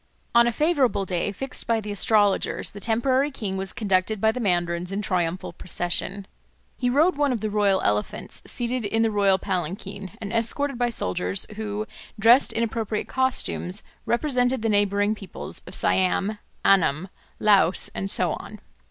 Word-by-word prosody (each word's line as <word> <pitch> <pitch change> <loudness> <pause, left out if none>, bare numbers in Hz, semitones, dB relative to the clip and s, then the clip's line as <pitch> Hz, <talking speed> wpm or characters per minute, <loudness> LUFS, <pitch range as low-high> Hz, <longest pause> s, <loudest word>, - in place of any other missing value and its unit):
On 235 0 +6
a - - +2
favourable 275 - +1
day 180 +2 -1
fixed 270 +6 -7
by 230 -1 +2
the 210 -1 -6
astrologers 205 0 +2
the 200 - -9
temporary 255 +6 +2
king 210 -8 -4
was 190 0 -2
conducted 200 -1 0
by 220 +2 +3
the 250 - -5
mandarins 175 -3 0
in 195 - -2
triumphal 180 -1 -1
procession. 185 +2 -1 0.5
He 250 - -1
rode 305 +6 +3
one 290 -2 +2
of 235 -4 -2
the 215 -1 -2
royal 200 -2 +2
elephants, 105 0 -2
seated 245 0 -2
in 225 +2 +1
the 225 - +1
royal 200 -2 +3
palanquin, 190 +1 -4
and 210 -1 -6
escorted 245 +3 0
by 245 0 +2
soldiers 90 - -2
who, 215 0 -4 0.3
dressed 235 +5 +6
in 230 - 0
appropriate 220 -2 -2
costumes, 260 -7 0 0.2
represented 250 -1 +1
the 225 - +1
neighbouring 205 0 +2
peoples 195 -4 -8
of 180 - -5
Siam, 195 +3 +1 0.3
Annam, 185 -2 +3 0.3
Laos, 200 -4 +3
and 195 - -4
so - - +1
on. - - -9
210 Hz, 160 wpm, -24 LUFS, 190-235 Hz, 0.5 s, On